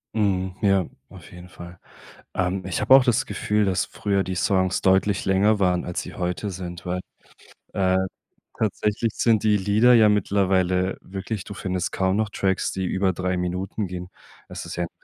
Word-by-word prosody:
Mhm, 95 Hz, -4 st, 0 dB
ja, 95 Hz, -3 st, +3 dB, 0.2 s
auf -, -, -14 dB
jeden 90 Hz, 0 st, -12 dB
Fall. 85 Hz, 0 st, -11 dB, 0.5 s
Ähm, 95 Hz, 0 st, -1 dB
ich 95 Hz, +1 st, -2 dB
habe 115 Hz, +5 st, +5 dB
auch 135 Hz, -1 st, +8 dB
das 125 Hz, +4 st, +2 dB
Gefühl, 105 Hz, -6 st, 0 dB
dass 95 Hz, -2 st, +1 dB
früher 100 Hz, -2 st, -1 dB
die 95 Hz, -, -3 dB
Songs 95 Hz, 0 st, +1 dB
deutlich 95 Hz, +1 st, +2 dB
länger 100 Hz, +2 st, +3 dB
waren, 90 Hz, -2 st, +1 dB
als 90 Hz, -, -3 dB
sie -, -, -9 dB
heute 90 Hz, +1 st, -3 dB
sind, 90 Hz, -1 st, -7 dB
weil, 90 Hz, +1 st, -2 dB, 0.8 s
äh, 95 Hz, -1 st, +2 dB, 0.6 s
tatsächlich 105 Hz, +1 st, -1 dB
sind 115 Hz, -3 st, +3 dB
die 105 Hz, -1 st, +3 dB
Lieder 105 Hz, +5 st, +4 dB
ja 110 Hz, -2 st, +6 dB
mittlerweile 95 Hz, -2 st, +1 dB
wirklich, 95 Hz, +2 st, -5 dB
du 100 Hz, -, -9 dB
findest 95 Hz, -2 st, -3 dB
kaum 95 Hz, +1 st, 0 dB
noch 110 Hz, -1 st, 0 dB
Tracks, 95 Hz, -1 st, -1 dB
die 95 Hz, -1 st, -3 dB
über 95 Hz, +1 st, 0 dB
3 90 Hz, +1 st, -2 dB
Minuten 90 Hz, +3 st, -3 dB
gehen. 90 Hz, 0 st, -7 dB, 0.4 s
Es -, -, -7 dB
ist -, -, -6 dB
ja 85 Hz, -, -1 dB
'n 85 Hz, -, -5 dB
95 Hz, 180 wpm, -24 LUFS, 90-105 Hz, 0.8 s, auch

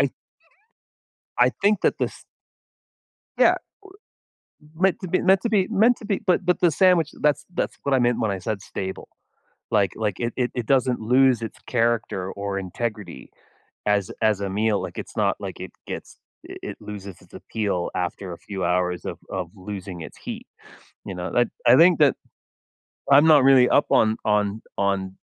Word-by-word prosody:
th -, -, -10 dB, 1.3 s
I -, -, +4 dB
think 210 Hz, +1 st, +4 dB
that -, -, +3 dB
this -, -, -3 dB, 1.1 s
yeah -, -, +6 dB, 1.2 s
w 170 Hz, -, -12 dB
meant 190 Hz, -3 st, +3 dB
to 185 Hz, -, -6 dB
be 185 Hz, -, +1 dB
meant 190 Hz, +1 st, +4 dB
to 235 Hz, -, -1 dB
be 195 Hz, -4 st, +2 dB
meant 230 Hz, +3 st, +4 dB
to 215 Hz, -, -11 dB
be 200 Hz, -2 st, -1 dB
but 180 Hz, +1 st, +2 dB
but 180 Hz, 0 st, +1 dB
the 175 Hz, -2 st, +4 dB
sandwich 175 Hz, -2 st, +3 dB
that's 150 Hz, 0 st, +1 dB
that's -, -, -2 dB
what 140 Hz, -, 0 dB
I 130 Hz, -, +4 dB
meant 120 Hz, -1 st, +2 dB
when 110 Hz, -2 st, 0 dB
I 95 Hz, -, -3 dB
said 100 Hz, +1 st, -4 dB
"stable". 95 Hz, -1 st, -6 dB, 0.6 s
Like 100 Hz, -4 st, +2 dB
like, 105 Hz, -4 st, -2 dB
it 120 Hz, -1 st, -2 dB
it 125 Hz, -1 st, 0 dB
it 120 Hz, -, -2 dB
doesn't 130 Hz, 0 st, +2 dB
lose 125 Hz, +2 st, +3 dB
its 115 Hz, -, -6 dB
character 115 Hz, -6 st, 0 dB
or 100 Hz, -1 st, -4 dB
integrity 105 Hz, +2 st, -6 dB, 0.6 s
as 100 Hz, -2 st, +1 dB
as 110 Hz, -2 st, +2 dB
a 100 Hz, -, -2 dB
meal, 105 Hz, +1 st, +1 dB
like, 90 Hz, -2 st, -7 dB
it's -, -, -8 dB
not -, -, +1 dB
like -, -, -7 dB
it -, -, -7 dB
gets -, -, -8 dB, 0.3 s
i -, -, -8 dB
it -, -, -6 dB
loses 100 Hz, -3 st, -9 dB
its -, -, -21 dB
appeal 100 Hz, -5 st, -3 dB
after 90 Hz, +1 st, -3 dB
a 85 Hz, -, -8 dB
few 95 Hz, -3 st, -5 dB
hours 90 Hz, 0 st, 0 dB
of -, -, -5 dB
of 90 Hz, -3 st, -4 dB
losing 95 Hz, -2 st, -7 dB
its -, -, -11 dB
heat, -, -, -7 dB, 0.6 s
you 95 Hz, -, -5 dB
know, 90 Hz, 0 st, -5 dB
I 120 Hz, -1 st, +4 dB, 0.3 s
I -, -, +8 dB
think 170 Hz, +3 st, +6 dB
that 145 Hz, -4 st, +5 dB, 1.0 s
I'm 145 Hz, +3 st, +7 dB
not 150 Hz, -4 st, +7 dB
really 130 Hz, -2 st, +6 dB
up 145 Hz, -, +3 dB
on 110 Hz, 0 st, +3 dB
on 105 Hz, 0 st, +1 dB, 0.2 s
on 100 Hz, -1 st, -1 dB
110 Hz, 180 wpm, -23 LUFS, 100-145 Hz, 1.3 s, I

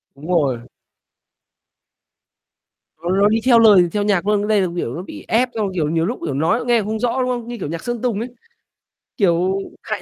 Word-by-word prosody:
Đúng 145 Hz, +4 st, -11 dB
rồi. 140 Hz, -8 st, +1 dB, 2.4 s
Nó 175 Hz, -, -2 dB
nó 200 Hz, +2 st, +3 dB
đi 225 Hz, +1 st, +2 dB
theo 240 Hz, -3 st, +6 dB
lời 200 Hz, -6 st, +6 dB
theo 205 Hz, -1 st, -1 dB
nhạc 200 Hz, -2 st, 0 dB
luôn, 210 Hz, -1 st, +3 dB
nhưng 205 Hz, -, -2 dB
đây 215 Hz, -2 st, +3 dB
là, 185 Hz, -, +1 dB
kiểu, 130 Hz, -7 st, -3 dB
nó 175 Hz, -, -5 dB
bị -, -, -10 dB
ép 245 Hz, +3 st, +2 dB
xong, 215 Hz, -2 st, 0 dB
kiểu, 155 Hz, -4 st, -1 dB
nhiều 165 Hz, 0 st, 0 dB
lúc, 240 Hz, +6 st, -3 dB
kiểu, 145 Hz, -, -2 dB
nói 205 Hz, -, 0 dB
nghe 240 Hz, -2 st, +3 dB
không 215 Hz, +1 st, -3 dB
rõ, 245 Hz, +2 st, 0 dB
đúng 255 Hz, -, -1 dB
không? 240 Hz, -2 st, -3 dB
Như 240 Hz, 0 st, -6 dB
kiểu 150 Hz, -, -4 dB
nhạc 165 Hz, 0 st, -5 dB
Sơn 240 Hz, -2 st, -4 dB
Tùng 235 Hz, -5 st, -1 dB
ấy, 235 Hz, -, -4 dB, 0.9 s
kiểu, 185 Hz, -1 st, +2 dB, 0.2 s
hay -, -, -4 dB
205 Hz, 215 wpm, -20 LUFS, 170-230 Hz, 2.4 s, theo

